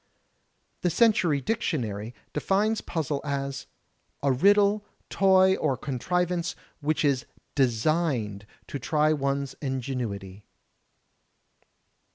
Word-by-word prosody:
The 180 - +2
Century 175 -8 +3
Dictionary 125 - -2 0.2
defines 205 +8 +1
puzzle 150 -4 -2
as 140 -1 -3 0.6
"A 140 - +3
riddle, 200 +8 +4 0.3
toy 190 -1 +5
or 130 - 0
contrivance 175 +6 -1 0.2
which 155 +1 0
is 135 -4 +1 0.3
designed 120 - 0 0.2
to 140 - -5
try 155 +3 +2
one's 140 -1 -1
ingenuity." 120 -8 -4
145 Hz, 90 wpm, -27 LUFS, 130-180 Hz, 0.6 s, toy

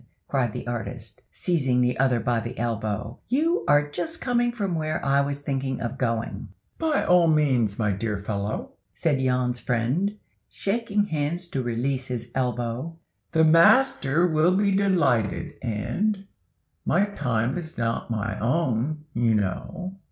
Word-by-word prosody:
cried 130 -5 0
the - - -6
artist, 120 -3 -5
seizing 135 -8 +1
the 125 0 +2
other 130 -3 +3
by 115 +1 0
the 120 +2 -6
elbow, 110 0 -3
"you 320 - +1
are 145 0 +4
just 320 - -4
coming 240 -1 +1
from 200 -6 -2
where 155 -1 -1
I 140 0 +4
was 140 0 -2
thinking 135 -2 -2
of 125 +3 -4
going." 115 -2 -2 0.3
"By 320 -2 +1
all 180 -1 +5
means, 130 -10 +2
my 105 -2 +1
dear 105 +1 -2
fellow," 100 +1 -3 0.2
said 145 -5 +1
Jan's 125 -1 +1
friend, 135 - 0 0.3
shaking 205 0 0
hands 160 +1 -2
to 135 - -2
release 130 +2 -1
his 120 -1 -5
elbow, 125 +5 -2 0.3
"the 160 - +4
master 165 - +5
will 165 +2 +3
be 200 0 +2
delighted, 165 - +1
and—my 125 - -2
time 125 -3 0
is 160 -1 -9
not 115 +1 -1
my 110 -1 -2
own, 145 +3 0
you 115 -1 +2
know." 180 - -3
135 Hz, 145 wpm, -25 LUFS, 115-170 Hz, 0.3 s, all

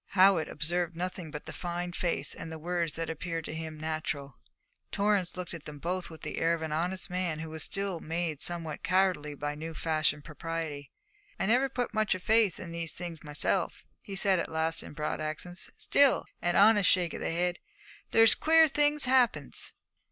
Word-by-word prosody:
Howitt 190 -3 +5
observed 175 +2 -1
nothing 180 -1 -4
but 150 0 -7
the - - -7
fine 175 0 -3
face 175 -1 0
and 165 - -7
the 160 - -5
words 170 -1 -1
that 165 0 -2
appeared 165 0 -4
to - - -5
him 160 -1 -6
natural. 155 -3 -4 0.5
Torrance 200 -3 +1
looked 180 -2 -5
at 165 -3 -8
them 150 -1 -8
both 180 +4 -3
with 160 -1 -12
the - - -4
air 165 +1 +3
of 160 - -6
an 160 - -3
honest 180 +4 -2
man 180 -3 -1
who 160 0 -6
was 160 0 -5
still 195 -2 -2
made 160 -2 -3
somewhat 165 -3 -3
cowardly 185 -6 +1
by 145 +1 -3
new 160 +2 -7
fashioned 155 -2 0
propriety. 160 -2 -5 0.5
'I - - +1
never 250 +6 +3
put 250 -2 -2
much 215 -3 +2
o' - - -2
my 180 - -17
faith 220 -3 +3
in 170 - -7
these 170 -1 -4
things 170 -3 -6
myself,' 150 -1 -1 0.2
he 195 - -7
said 195 -2 +3
at 170 - -3
last 160 +1 +1
in - - -10
broad 150 +1 -3
accents, 155 +4 -5
'still,' 280 -2 +4 0.2
an 175 0 +1
honest 205 -1 +6
shake 175 -2 +2
of - - -6
the - - -1
head 175 +1 0 0.5
'there's 225 0 +7
queer 320 0 +5
things 295 0 +3
happens.' 245 - +2
170 Hz, 195 wpm, -30 LUFS, 155-190 Hz, 0.5 s, there's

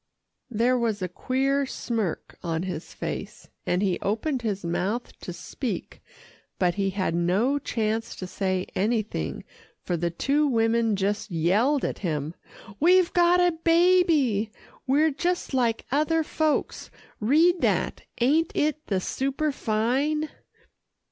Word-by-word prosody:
There 245 +2 +2
was 220 -4 -1
a - - 0
queer 270 +8 0
smirk 225 -9 -3
on 165 -1 -2
his 180 -3 -5
face, - - -6 0.2
and 180 +3 +1
he 185 -3 +1
opened 245 +6 -1
his 200 -5 -3
mouth 195 +8 -2
to - - -7
speak, 195 +7 -5 0.6
but 180 -2 +2
he 195 +1 0
had 190 -3 -1
no 195 +12 +1
chance 225 -3 -2
to 185 - -6
say 185 0 -1
anything 210 - -1 0.4
for 175 - -1
the 170 +1 -1
two 280 - +1
women 225 -3 +2
just 205 +2 -1
yelled 200 - +2
at - - -3
him, 155 -4 -2 0.5
"We've 360 +2 +4
got 350 0 +4
a 355 0 +4
baby 330 - +4 0.4
we're 300 +4 +3
just 350 +2 -2
like 235 -3 +1
other 310 +3 +2
folks 310 0 -1 0.3
read 325 - +4
that - - 0 0.2
ain't 300 +7 +3
it 305 +1 0
the 195 -3 +1
superfine!" 275 +3 0
230 Hz, 130 wpm, -26 LUFS, 195-295 Hz, 0.6 s, We've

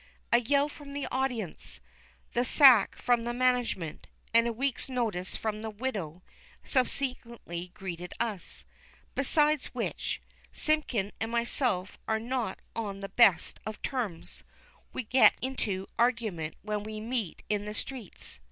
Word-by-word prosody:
A 235 - +7
yell 280 +4 +3
from 290 -1 -10
the 285 0 -2
audience, 250 -9 -2 0.5
the 240 - +2
sack 250 -5 +7
from 245 -1 +2
the 240 +1 -3
management, 245 -10 +1 0.3
and 230 +1 +6
a - - +1
week's 270 +3 -1
notice 220 -8 -1
from 215 -1 -2
the 220 - -3
widow, 200 -8 -4 0.4
subsequently 235 - -1
greeted 180 -2 -6
us. 220 -6 -3 0.5
Besides 300 +1 +3
which, - - -2 0.3
Simpkin 260 -10 +1
and 225 +1 -2
myself 235 -5 0
are 220 - +2
not 235 -3 -2 0.2
on 200 -3 -3
the 195 - -5
best 200 -7 +4
of 215 0 -6
terms. 225 -11 -3 0.5
We - - -3
get 255 +4 +6
into 210 -7 -2
argument 220 -10 +1
when 210 0 -1
we 215 +1 -6
meet 225 -4 -3
in 210 -1 0
the 210 0 -5
streets. 235 - -6
230 Hz, 135 wpm, -30 LUFS, 200-255 Hz, 0.5 s, A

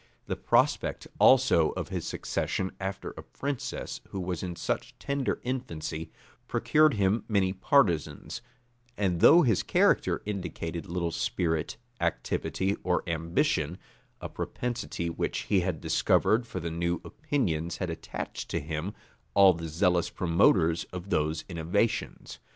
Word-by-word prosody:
The - - -2
prospect - - +1
also 125 -12 +6
of - - -4
his - - -3
succession 95 - -2
after 95 0 -4
a - - -9
princess 140 -2 -5
who 95 - -5
was 90 -2 -3
in 90 -2 -4
such - - -3
tender 140 -2 -1
infancy, 80 -11 -4 0.4
procured 155 -3 +3
him 100 +2 +2
many 95 -4 +2
partisans; 95 - +1 0.6
and 95 -4 +1
though 170 - +8
his 110 -9 +3
character - - +2
indicated 85 -5 -4
little 85 -1 -2
spirit, 80 -1 -1 0.2
activity, 95 +10 -1
or 90 -1 0
ambition, 85 - 0 0.4
a - - -5
propensity 120 -8 -4
which 85 - -2
he 100 - +2
had 90 -3 -1
discovered 115 +2 +2
for 95 - -5
the 85 -1 -4
new 85 +1 -1
opinions 90 - -2
had 90 -3 -2
attached 80 - -6
to - - -1
him 80 +6 -4 0.4
all 95 -2 +8
the 85 -1 -6
zealous 85 +2 +2
promoters 85 -1 +3
of 90 +2 -8
those 80 +1 0
innovations. 90 +6 -1
90 Hz, 135 wpm, -28 LUFS, 85-105 Hz, 0.6 s, though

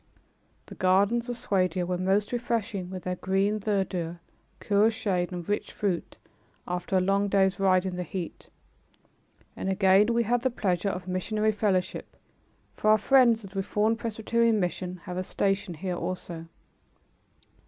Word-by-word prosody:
The - - -11
gardens 200 +6 +2
of 245 - -3
Swadia 185 -6 0
were 180 +1 -1
most 190 +3 +1
refreshing 230 -6 -2
with 185 -1 -7
their 180 0 -3
green 195 +3 +1
verdure, 190 -5 -2 0.4
cool 205 +1 +3
shade 190 -5 -1
and 175 -2 -6
rich 205 - -2
fruit, 190 -5 -2 0.5
after 180 +2 -1
a - - +5
long 195 +2 +2
day's 190 -1 +2
ride 185 -1 +3
in 185 -1 -3
the - - -2
heat, 180 0 -6 1.1
and 190 - -3
again 195 +3 +4
we 235 0 +2
had 240 +2 +1
the 260 - +1
pleasure 195 -5 -1
of 180 -1 -5
missionary 215 +4 0
fellowship, 200 -3 -1 0.6
for 215 - 0
our 215 - +7
friends 235 0 +4
of 195 - -10
the 195 - -8
Reformed 210 +3 +1
Presbyterian 230 0 +1
mission 180 -1 -3
have 180 0 -6
a 185 - -1
station 195 -1 -1
here 180 +2 -3
also. 170 -3 -5
195 Hz, 155 wpm, -27 LUFS, 185-215 Hz, 1.1 s, our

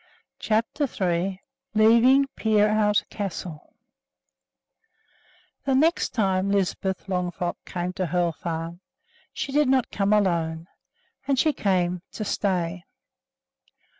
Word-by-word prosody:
CHAPTER 225 +7 0
III 185 0 -1 0.3
LEAVING 235 +5 +6
PEEROUT 210 -1 +2
CASTLE 180 -6 -6 1.9
The 270 -1 +2
next 320 +6 +2
time 195 -3 +1
Lisbeth 190 -1 -1
Longfrock 180 -2 -2
came 180 0 -3
to 185 -1 -2
Hoel 175 +1 +1
Farm, 165 +1 -5 0.5
she 275 - -4
did 295 -1 +3
not 260 -2 +2
come 200 0 0
alone; 170 -6 +1 0.6
and 275 -1 +2
she 310 +3 +3
came 180 -5 0
to 215 - -4
stay! 180 -3 -1
195 Hz, 105 wpm, -25 LUFS, 175-220 Hz, 1.9 s, LEAVING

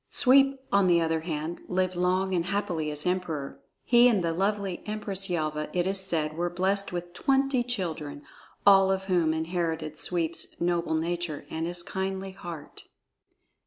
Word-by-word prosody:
Sweep, 275 +1 +5
on 200 -1 +4
the 175 -1 +5
other 165 -1 +1
hand, 160 0 -4
lived 185 0 0
long 185 +2 +1
and 170 -2 +1
happily 180 -5 -1
as 150 0 -3
Emperor. 175 -6 -2 0.2
He 240 0 +6
and 205 -7 +1
the 165 -1 0
lovely 195 0 -1
Empress 200 -2 -2
Yelva, 155 -3 -2
it 175 -1 +1
is 195 +1 0
said, 160 -5 +1
were 175 +1 -1
blessed 190 +3 0
with 175 0 -5
twenty 270 +2 +2
children, 160 -11 -4 0.4
all 195 -1 +7
of 190 0 0
whom 175 -4 +2
inherited 160 -1 -2
Sweep's 170 -2 -2
noble 170 -1 0
nature 170 -2 -2
and 160 +1 -2
his 175 0 -4
kindly 190 +1 -3
heart. 175 -5 -9
175 Hz, 160 wpm, -27 LUFS, 165-195 Hz, 0.4 s, all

